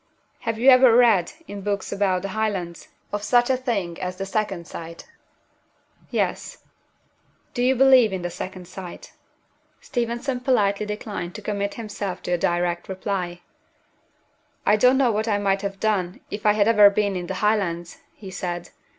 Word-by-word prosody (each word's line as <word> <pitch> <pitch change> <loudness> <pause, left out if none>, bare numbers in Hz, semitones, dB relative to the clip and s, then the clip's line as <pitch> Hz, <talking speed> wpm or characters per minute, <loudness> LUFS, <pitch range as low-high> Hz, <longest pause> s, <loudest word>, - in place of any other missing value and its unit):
"Have 230 -1 -3
you 245 +4 0
ever 255 -2 +7
read, 230 - +4
in 200 0 -7
books 200 0 -2
about 190 -2 0
the 195 - -3
Highlands, 195 -5 -3 0.2
of 205 - -2
such 240 +4 +3
a - - +3
thing 200 -10 -3
as 185 0 -3
'The 195 +1 -4
Second 195 -4 -2
Sight'?" 165 0 -9 1.0
"Yes." - - -2 1.0
"Do 245 - -2
you 255 +2 +3
believe 260 -4 +6
in 185 -2 -4
the 175 - -3
Second 185 0 -7
Sight?" 185 -1 -10 0.7
Steventon 240 +1 -2
politely 210 -5 +1
declined 210 -4 -5
to 215 - -8
commit 200 -1 -2
himself 205 -4 -5
to - - -4
a 175 - +2
direct 175 +1 -1
reply. 185 -2 -3 1.2
"I 210 - +5
don't 250 +4 +4
know 260 -3 +3
what 215 +1 -1
I 210 -2 +2
might 195 -1 0
have 195 -1 -4
done, 195 -5 -1
if 210 +1 -2
I 210 - +6
had 210 0 +2
ever 210 -3 +7
been 200 -1 0
in 175 -1 -4
the 190 - -4
Highlands," 185 -5 -1 0.2
he 195 -3 -10
said. 175 -2 -4
200 Hz, 170 wpm, -23 LUFS, 185-220 Hz, 1.2 s, ever